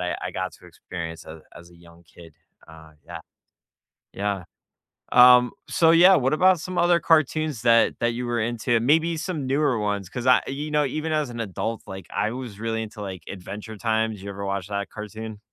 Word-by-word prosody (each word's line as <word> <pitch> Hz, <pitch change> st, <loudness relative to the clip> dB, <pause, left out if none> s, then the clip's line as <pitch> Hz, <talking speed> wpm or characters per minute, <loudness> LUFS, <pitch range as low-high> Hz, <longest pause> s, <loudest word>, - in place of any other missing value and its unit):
I 90 Hz, -1 st, -2 dB
I -, -, -3 dB
got 95 Hz, -2 st, -4 dB
to -, -, -17 dB
experience 85 Hz, -1 st, -8 dB
as 80 Hz, 0 st, -10 dB, 0.2 s
as 85 Hz, 0 st, -14 dB
a 85 Hz, -, -18 dB
young 85 Hz, 0 st, -19 dB
kid, 85 Hz, -1 st, -16 dB, 0.3 s
uh, 80 Hz, -1 st, -14 dB
yeah. -, -, -8 dB, 0.9 s
Yeah, 100 Hz, -2 st, -3 dB, 0.7 s
um, 125 Hz, 0 st, +7 dB, 0.2 s
so 165 Hz, -1 st, +4 dB
yeah, 180 Hz, +3 st, +7 dB
what 135 Hz, -1 st, +1 dB
about 185 Hz, +3 st, +4 dB
some 180 Hz, +2 st, -6 dB
other 175 Hz, 0 st, +4 dB
cartoons 155 Hz, -4 st, +1 dB
that 115 Hz, -1 st, +4 dB
that 120 Hz, 0 st, 0 dB
you 125 Hz, +1 st, -4 dB
were 120 Hz, -2 st, -1 dB
into, 120 Hz, +1 st, 0 dB
maybe 160 Hz, +7 st, +2 dB
some 155 Hz, -5 st, -4 dB
newer 135 Hz, -3 st, +1 dB
ones, 100 Hz, -3 st, -2 dB
'cause 125 Hz, +3 st, -5 dB
I, 125 Hz, -, +6 dB
you 145 Hz, +3 st, -5 dB
know, 150 Hz, -1 st, +2 dB
even 155 Hz, +4 st, -3 dB
as 150 Hz, -3 st, 0 dB
an 120 Hz, -, -8 dB
adult, 110 Hz, +2 st, -4 dB
like, 95 Hz, -3 st, -9 dB
I 110 Hz, -, 0 dB
was 120 Hz, -5 st, -7 dB
really 115 Hz, 0 st, -2 dB
into, 110 Hz, 0 st, -9 dB
like, 95 Hz, -4 st, -7 dB
Adventure 100 Hz, +3 st, -8 dB
Time. 110 Hz, 0 st, 0 dB
Did 100 Hz, -, -11 dB
you 100 Hz, -, -7 dB
ever 100 Hz, 0 st, -6 dB
watch 100 Hz, -1 st, -3 dB
that 100 Hz, 0 st, -3 dB
cartoon? 110 Hz, 0 st, -8 dB
115 Hz, 200 wpm, -24 LUFS, 100-145 Hz, 0.9 s, um